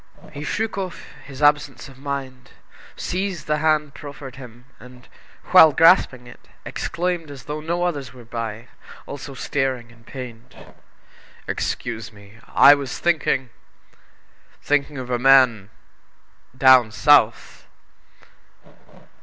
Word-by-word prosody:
He 145 - -8
shook 220 +5 -3
off 185 -2 -6 0.2
his 140 +1 -8
absence 145 -1 +1
of 135 -1 -16
mind, 135 -2 -6 0.5
seized 185 -3 -4
the 150 0 0
hand 155 -2 +1
proffered 140 -3 -10
him, 125 -2 -13
and, 125 +1 -15 0.4
while 160 - +8
grasping 160 -6 +4
it, 120 - -16 0.2
exclaimed 175 -2 -3
as 140 -3 -10
though 150 +1 -6
no 170 +3 -2
others 145 -8 -3
were 125 -2 -14
by, 115 0 -6 0.4
also 140 -1 -9
staring 130 -3 -3
and 115 0 -21
pained: 125 0 -10 0.9
"Excuse 115 -2 -4
me! 100 +1 -17
I 145 - +7
was 140 -3 -4
thinking 135 -7 0 1.1
thinking 145 0 -1
of 125 -1 -6
a 120 - 0
man 125 -6 +4 0.9
down 130 -3 +6
South!" 130 -3 +2
135 Hz, 120 wpm, -21 LUFS, 125-150 Hz, 1.1 s, while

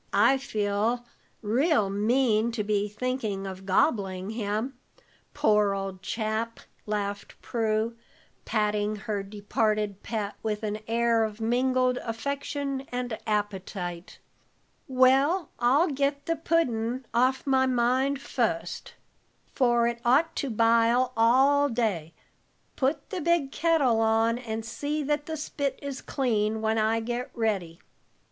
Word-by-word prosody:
I 235 +7 +4
feel 220 0 -1 0.4
real 245 - +2
mean 220 +2 +2
to 220 -2 -1
be 205 0 0
thinking 215 -3 -3
of 190 0 -7
gobbling 190 -2 +1
him, 220 +4 -2 0.6
poor 210 -8 +3
old 195 -1 -5
chap," 220 +3 -2 0.3
laughed 205 -1 -3
Prue, 225 0 0 0.5
patting 210 -1 0
her 210 0 -3
departed 210 0 -1
pet 210 -3 -3
with 215 0 -3
an 210 0 -2
air 230 0 +2
of 215 0 -4
mingled 250 +2 +2
affection 275 +3 -3
and 245 -2 -2
appetite. 190 -4 -3 0.7
"Well, 270 +6 +3
I'll 270 +8 +4
get 280 +1 -1
the 330 - 0
puddin' 255 -7 0
off 255 +3 +2
my 265 -1 +3
mind 260 +3 +1
fust, 175 -11 -2 0.6
for 240 -3 +3
it 235 0 -2
ought 285 +7 +3
to 280 - -1
bile 230 +2 +3
all 270 +5 +4
day. 200 - -1 0.6
Put 280 +2 -1
the 370 - -3
big 330 -4 +1
kettle 290 -10 +2
on, 225 +1 +2
and 225 -2 -5
see 295 +6 -3
that 295 +1 -1
the 320 -1 -3
spit 280 -2 -3
is 280 -2 -6
clean, 220 -5 0
while 220 0 +1
I 220 +1 +2
get 240 +2 -3
ready." 195 -8 -1
230 Hz, 125 wpm, -27 LUFS, 210-265 Hz, 0.7 s, I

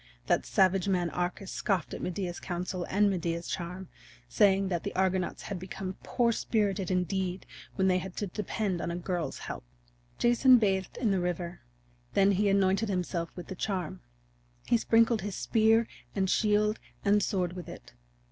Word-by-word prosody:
That - - +1
savage 190 0 +3
man 180 -3 +1
Arcas 180 +2 -3
scoffed 190 -6 -1
at - - -5
Medea's 180 -1 -3
counsel 180 0 -3
and 205 +2 +3
Medea's 170 -3 -1
charm, 180 +1 -5 0.4
saying 195 - +3
that 175 -3 -1
the - - -5
Argonauts 190 -1 0
had 195 -3 -5
become 185 +1 -6
poor 235 -1 +1
spirited 205 -5 0
indeed 185 0 -1 0.3
when 190 - +2
they 185 -1 +3
had 185 0 -7
to 205 - -1
depend 200 -1 -2
upon - - -2
a 170 - -2
girl's 175 -1 -3
help. - - -6 0.5
Jason 245 +2 +6
bathed 195 -4 0
in 225 -5 +1
the 190 - +2
river; 175 0 -3 0.5
then 195 +1 +5
he 200 +1 +2
anointed 195 +2 +2
himself 180 -3 -2
with 175 - -7
the - - -6
charm; 180 - -3 0.6
he - - +3
sprinkled 230 0 +3
his 200 -1 -4
spear 225 0 +3 0.3
and 190 -2 +1
shield 210 0 +2 0.3
and 205 +1 +4
sword 185 -3 0
with 180 -1 -8
it. - - -11
190 Hz, 165 wpm, -29 LUFS, 180-205 Hz, 0.6 s, Jason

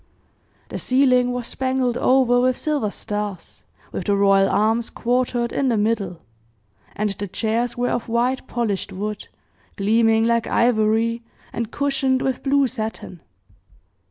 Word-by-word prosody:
The - - -5
ceiling 255 -1 +3
was 245 -1 -3
spangled 260 -1 -1
over 250 -1 +3
with 255 0 +2
silver 295 -9 -1
stars, 205 -3 -6 0.3
with - - -5
the 205 - +2
royal 195 -1 +4
arms 225 +2 +1
quartered 245 -1 -1
in 270 -2 +1
the 230 - +1
middle, 205 -5 -1 0.7
and 210 0 -1
the 200 +1 -5
chairs 230 +5 -2
were 245 0 0
of 240 - -3
white, 245 +3 0
polished 220 -5 -2
wood, 210 +2 -5 0.5
gleaming 225 +2 +3
like 235 0 +1
ivory, 230 0 +2 0.3
and 230 -2 -3
cushioned 270 -1 0
with 265 -2 -1
blue 280 0 +2
satin. 220 - -5
235 Hz, 135 wpm, -22 LUFS, 215-255 Hz, 0.7 s, royal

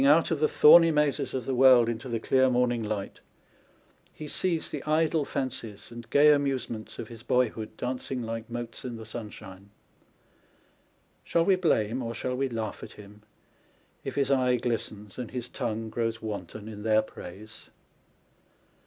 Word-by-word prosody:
10 - - +4
J - - +7
out 160 +3 +4
of 160 - 0
the 155 - +3
thorny 165 +3 +7
mazes 150 -2 +1
of 125 -3 -3
the 135 - -1
world 125 -2 +6
into 120 +2 -4
the 115 -1 -1
clear 130 +3 +3
morning 120 -1 +1
light, 105 -2 -4 0.9
he 155 - -9
sees 170 +1 -1
the 145 - -4
idle 155 0 +2
fancies 115 -7 -5
and 120 0 -10
gay 150 +1 +6
amuse 140 -4 -1
ments 110 -2 -7
of - - -6
his 115 -2 -11
boyhood 115 -3 -1
dancing 125 0 -3
like 115 +1 -5
motes 120 -1 -6
in 125 -2 -5
the 110 -1 -9
sunshine. 105 -3 -9 1.5
Shall 165 0 +1
we 195 - +5
blame 130 - +1
or 115 -1 -4
shall 125 0 -3
we 135 +1 -1
laugh 110 -3 -4
at - - -9
him, 105 0 -14 0.8
if - - -5
his 140 -1 +1
eye 130 -2 +3
glistens, 115 -3 -4
and 120 -3 -5
his 125 -2 -5
tongue 115 -3 -4
grows 115 -1 -2
wanton 105 -1 -6
in 105 -2 -8
their 110 0 +3
praise 105 +2 -11
120 Hz, 170 wpm, -28 LUFS, 110-135 Hz, 1.5 s, J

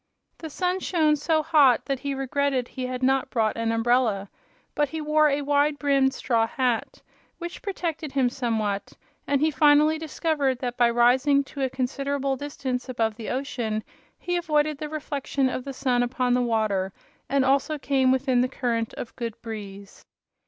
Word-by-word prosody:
The 320 - -6
sun 360 +4 -1
shone 315 -5 +2
so 310 +1 +1
hot 285 -6 +4
that 275 -2 -2
he 280 +1 -3
regretted 270 -1 0
he 255 -1 -4
had 255 0 -4
not 265 0 +2
brought 220 -2 0
an 230 0 -1
umbrella. 225 -4 +1 0.4
But 295 -2 +1
he 320 - -5
wore 305 0 +3
a 285 0 0
wide 290 +1 +2
brimmed 275 -2 +2
straw 230 -2 +1
hat, 245 -2 -2 0.3
which 345 0 -7
protected 335 -6 -4
him 270 -3 +3
somewhat, 225 -5 -2 0.3
and 280 - +2
he 310 +1 +3
finally 300 +2 +4
discovered 300 -4 -1
that 245 -1 -4
by 240 -1 +4
rising 255 +4 +4
to 280 +1 -8
a 265 - +1
considerable 275 +1 -2
distance 265 -2 -4
above 225 -3 0
the 225 -1 -6
ocean 235 -5 -2 0.3
he 355 0 -2
avoided 305 -3 0
the 305 - -4
reflection 280 -3 -2
of 255 0 -4
the 275 - -4
sun 250 -2 +1
upon 245 0 0
the 250 - +2
water 215 -5 0 0.4
and 275 -1 +2
also 275 +3 +2
came 270 -2 +2
with 260 +1 +1
the 255 -1 +2
current 230 -3 -2
of 230 - -7
good 230 -3 -5
breeze. 200 -3 -8
265 Hz, 175 wpm, -25 LUFS, 245-290 Hz, 0.4 s, hot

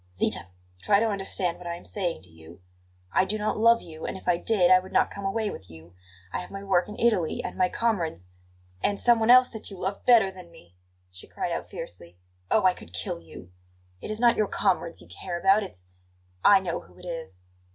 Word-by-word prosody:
"Zita! 90 - 0 0.3
Try 200 - +3
to 225 0 +1
understand 190 -3 -3
what 175 - -9
I 170 - -3
am 175 - -13
saying 175 - -3
to 90 - -18
you. 80 +2 -15 0.5
I - - +3
do 200 +3 -2
not 215 0 -2
love 230 +1 +5
you; 160 -1 -11
and - - -4
if - - -15
I 180 - +4
did 185 0 +2
I 185 - +8
would 185 +1 -11
not - - +2
come 200 0 -7
away 210 +2 -1
with 95 - -10
you. 80 +1 -14 0.4
I - - -1
have 180 - -8
my 195 0 -7
work 190 -1 +1
in 210 - -8
Italy, 215 -9 +1
and - - -5
my 185 -1 +2
comrades 170 - -1 0.3
" 90 0 -32
"And 200 -1 +1
someone 235 -2 +3
else 250 +1 +8
that 220 - -8
you 195 - -10
love 190 +2 -4
better 225 -6 +5
than 185 -2 -13
me!" 90 - -18 0.4
she 90 0 -13
cried - - -4
out - - -4
fiercely. 85 0 -9 0.3
"Oh, 215 - +3
I 185 - +5
could 85 - -14
kill 90 -2 -3
you! 85 +2 -13 0.5
It - - -7
is 215 0 -2
not 240 -1 +4
your 215 - +2
comrades 185 -5 -1
you 85 - -15
care 135 - -6
about; 195 +3 +4
it's 90 - -9 0.6
I 200 -2 +7
know 175 -3 -3
who - - -19
it 180 - -13
is!" 160 - -7
185 Hz, 230 wpm, -26 LUFS, -, 0.6 s, I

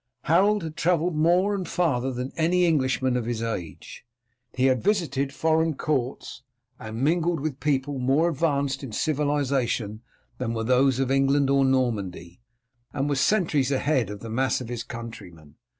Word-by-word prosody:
Harold 200 +5 +3
had 160 -1 -6
travelled 175 0 +1
more 175 +6 +3
and 190 -3 -3
farther 135 -7 0
than 125 +1 -4
any 175 +2 +2
Englishman 130 -5 +1
of 120 -2 -2
his 115 -1 -2
age. 90 -9 -6 0.5
He 130 0 +1
had 130 -2 +2
visited 160 -9 0
foreign 160 +1 +1
courts 135 -4 -3 0.4
and 110 +3 -5
mingled 170 +2 +1
with 140 -2 -4
people 140 0 -1
more 135 +6 +2
advanced 140 -4 0
in 125 -5 -7
civilization 135 -7 -1 0.4
than 115 -2 -2
were 115 - -2
those 130 +2 +3
of 135 -1 0
England 135 0 +2
or 140 0 +4
Normandy, 105 -9 -1 0.5
and 140 0 -2
was 140 -2 +1
centuries 160 -10 +2
ahead 135 -5 +1
of 105 -1 -7
the 115 - -7
mass 130 +3 +1
of 125 -3 -7
his 120 -2 -4
countrymen. 95 -12 -10
135 Hz, 160 wpm, -25 LUFS, 120-155 Hz, 0.5 s, or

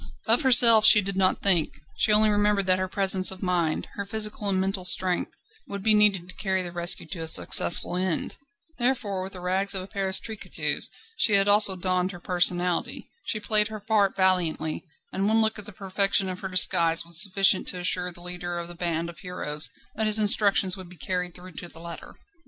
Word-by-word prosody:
Of - - +2
herself 235 -5 +7
she 215 - +8
did 195 -1 -4
not 190 -1 0
think; 175 -7 +2 0.2
she - - +1
only 215 0 +4
remembered 205 -1 0
that 185 0 +2
her 185 - -3
presence 190 -1 0
of 190 0 -8
mind, 175 -4 -2
her 200 - -6
physical 210 +1 -2
and 190 -1 0
mental 190 0 -3
strength, 180 0 0 0.3
would 200 -1 -8
be 220 0 +2
needed 205 -4 +1
to 185 - -10
carry 190 -2 -3
the 175 - -7
rescue 175 0 -2
to 180 - -8
a 160 - -6
successful 170 +2 +2
end. 185 -2 -3 0.4
Therefore 240 -6 -2
with 190 +1 -8
the 180 - -10
rags 190 +2 -1
of 185 - -3
a - - -12
Paris 195 -2 -2
tricotteuse 220 -2 -3 0.3
she 215 - +2
had 200 0 +2
also 205 -1 +4
donned 185 +1 -2
her 175 - -11
personality. 175 0 -1
She 215 - -4
played 210 0 +3
her 215 -1 -9
part 205 -2 -1
valiantly, 180 -5 -1 0.3
and 195 +1 -2
one 220 +1 +3
look 220 -1 0
at 210 - -8
the - - -9
perfection 195 0 -2
of 185 0 -7
her 195 - -6
disguise 170 -3 +2
was 170 -1 +3
sufficient 195 -2 +1
to - - -2
assure 180 0 -2
the 175 0 -13
leader 175 0 -7
of 170 0 -7
this 175 - -12
band 170 -1 -3
of 170 - -12
heroes 150 -5 +1 0.2
that 220 -1 -2
his 215 0 +4
instructions 200 -3 +3
would 185 -3 -12
be 180 - -16
carried 180 +4 -5
through 185 +1 -13
to 175 - -10
the 165 - -16
letter. 170 0 -11
190 Hz, 210 wpm, -24 LUFS, 180-205 Hz, 0.4 s, she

